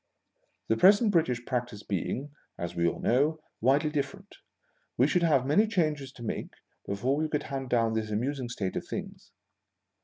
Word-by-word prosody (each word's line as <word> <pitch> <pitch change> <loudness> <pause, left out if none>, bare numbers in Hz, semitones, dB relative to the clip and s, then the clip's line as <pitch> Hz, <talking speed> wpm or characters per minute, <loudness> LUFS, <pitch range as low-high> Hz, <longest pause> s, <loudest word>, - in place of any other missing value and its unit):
The 110 - +3
present 205 - +6
British 125 -9 +1
practice 120 -5 -3
being, 125 - -3 0.3
as 85 0 -5
we 85 0 +2
all - - -2
know, 145 +6 +2 0.2
widely 140 +6 +3
different, 195 +7 -4 0.6
we - - +5
should 180 - +2
have 145 -6 +3
many 165 +11 +4
changes 155 - 0
to 120 - -11
make 115 - -4 0.3
before 105 +8 0
we 155 +1 -1
could 150 -1 -1
hand 135 -2 -5
down 115 -2 +2
this 110 -1 -2
amusing 125 +4 -2
state 100 -6 -3
of - - -4
things. - - -7
135 Hz, 165 wpm, -29 LUFS, 115-155 Hz, 0.6 s, present